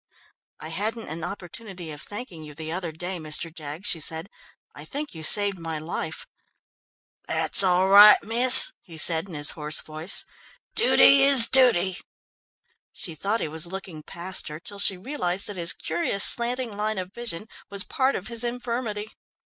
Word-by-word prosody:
"I 155 Hz, -, -9 dB
hadn't 220 Hz, +7 st, -5 dB
an 160 Hz, +1 st, -8 dB
opportunity 180 Hz, -1 st, -9 dB
of 150 Hz, -, -11 dB
thanking 205 Hz, -6 st, -9 dB
you 150 Hz, -1 st, -13 dB
the 160 Hz, +1 st, -8 dB
other 175 Hz, -1 st, -5 dB
day, 175 Hz, +3 st, -7 dB
Mr. 155 Hz, +1 st, -4 dB
Jaggs," 155 Hz, +4 st, -8 dB
she 180 Hz, -5 st, 0 dB
said. 160 Hz, +4 st, -3 dB, 0.4 s
"I -, -, -12 dB
think 295 Hz, +1 st, -7 dB
you 160 Hz, -, -9 dB
saved 200 Hz, +4 st, +2 dB
my 165 Hz, -1 st, -6 dB
life." 160 Hz, 0 st, -7 dB, 1.0 s
"That's -, -, +3 dB
all 185 Hz, 0 st, +2 dB
right, 205 Hz, +2 st, +7 dB
miss," 245 Hz, +4 st, +8 dB
he 165 Hz, -3 st, -13 dB
said, 160 Hz, +3 st, +1 dB
in 175 Hz, -, -11 dB
his 145 Hz, 0 st, +1 dB
hoarse 150 Hz, -1 st, 0 dB
voice. 155 Hz, +4 st, -2 dB, 0.5 s
"Dooty 355 Hz, -, +4 dB
is 270 Hz, -4 st, +8 dB
dooty!" 195 Hz, -9 st, +3 dB, 0.9 s
She 170 Hz, -, -6 dB
thought 205 Hz, +8 st, -3 dB
he -, -, -3 dB
was 160 Hz, +2 st, -3 dB
looking 185 Hz, -3 st, -9 dB
past 175 Hz, +4 st, -6 dB
her, 150 Hz, +1 st, -9 dB
till 200 Hz, +3 st, -12 dB
she 195 Hz, -1 st, -1 dB
realised 190 Hz, -5 st, -4 dB
that 205 Hz, -, -7 dB
his 170 Hz, -2 st, 0 dB
curious 170 Hz, +4 st, -3 dB
slanting 240 Hz, -2 st, 0 dB
line 215 Hz, +1 st, -4 dB
of 185 Hz, +1 st, -8 dB
vision 225 Hz, -5 st, -8 dB, 0.2 s
was 200 Hz, -1 st, -4 dB
part 270 Hz, -2 st, -2 dB
of 185 Hz, -, -7 dB
his 235 Hz, +1 st, -5 dB
infirmity. 235 Hz, -3 st, -5 dB
190 Hz, 170 wpm, -23 LUFS, 165-220 Hz, 1.0 s, miss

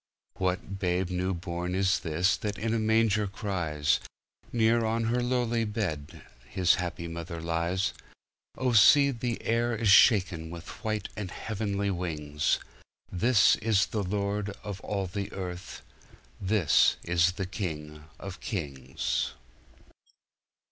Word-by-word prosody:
What 95 Hz, +1 st, -2 dB
babe 90 Hz, -1 st, 0 dB
new 90 Hz, +1 st, -1 dB
born 90 Hz, +1 st, -4 dB
is 95 Hz, 0 st, +2 dB
this 85 Hz, +4 st, +1 dB
that 105 Hz, -2 st, -4 dB
in 110 Hz, +2 st, -1 dB
a 115 Hz, -, +1 dB
manger 110 Hz, -1 st, +2 dB
cries? 85 Hz, -7 st, -1 dB, 0.5 s
Near 115 Hz, 0 st, +3 dB
on 115 Hz, +1 st, 0 dB
her 120 Hz, +2 st, +1 dB
lowly 120 Hz, -2 st, 0 dB
bed 100 Hz, -10 st, -4 dB, 0.3 s
his 90 Hz, -2 st, +3 dB
happy 85 Hz, -1 st, -4 dB
mother 85 Hz, 0 st, -6 dB
lies. 85 Hz, +3 st, -1 dB, 0.6 s
Oh, 130 Hz, -2 st, 0 dB
see 140 Hz, +6 st, +7 dB
the 120 Hz, -2 st, -3 dB
air 115 Hz, +1 st, +1 dB
is 110 Hz, -1 st, +1 dB
shaken 95 Hz, -5 st, +5 dB
with 85 Hz, 0 st, -9 dB
white 110 Hz, -1 st, -2 dB
and 100 Hz, -3 st, -4 dB
heavenly 100 Hz, 0 st, -2 dB
wings 75 Hz, -5 st, -1 dB, 0.5 s
This 110 Hz, +3 st, +4 dB
is 105 Hz, -2 st, +2 dB
the 105 Hz, -, -3 dB
Lord 100 Hz, +1 st, -1 dB
of 100 Hz, -2 st, -6 dB
all 100 Hz, -2 st, -2 dB
the 100 Hz, +2 st, -4 dB
earth, 90 Hz, -2 st, -6 dB, 0.6 s
this 95 Hz, -5 st, +4 dB
is 85 Hz, +1 st, +2 dB
the 95 Hz, 0 st, -3 dB
King 75 Hz, -6 st, -5 dB
of 95 Hz, -1 st, -7 dB
kings. 70 Hz, -, -3 dB
95 Hz, 130 wpm, -28 LUFS, 85-110 Hz, 0.6 s, see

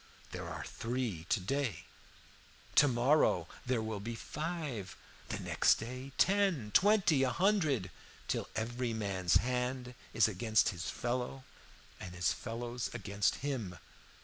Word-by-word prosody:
There -, -, -5 dB
are -, -, -5 dB
three 115 Hz, -8 st, -3 dB
to 115 Hz, -, +3 dB
day: 130 Hz, +5 st, -2 dB, 0.9 s
to 145 Hz, -, +7 dB
morrow 120 Hz, -, +3 dB, 0.2 s
there 120 Hz, -3 st, +1 dB
will 110 Hz, -2 st, -3 dB
be 115 Hz, +3 st, -5 dB
five, 150 Hz, -, -4 dB, 0.3 s
the -, -, -2 dB
next -, -, +3 dB
day 130 Hz, +4 st, -6 dB
ten, 185 Hz, -, +2 dB
twenty, 195 Hz, -8 st, +5 dB
a 135 Hz, -, +3 dB
hundred, 155 Hz, -, +2 dB, 0.4 s
till -, -, -2 dB
every 120 Hz, +2 st, -2 dB
man's 95 Hz, -5 st, 0 dB
hand 125 Hz, 0 st, 0 dB, 0.2 s
is 110 Hz, 0 st, +4 dB
against 110 Hz, +1 st, +2 dB
his 90 Hz, -1 st, -4 dB
fellow, 125 Hz, +2 st, -3 dB, 0.6 s
and 90 Hz, -1 st, -8 dB
his 90 Hz, -1 st, +2 dB
fellow's 120 Hz, +1 st, -4 dB
against 100 Hz, -3 st, 0 dB
him. 115 Hz, -11 st, -3 dB
120 Hz, 130 wpm, -33 LUFS, 105-135 Hz, 0.9 s, to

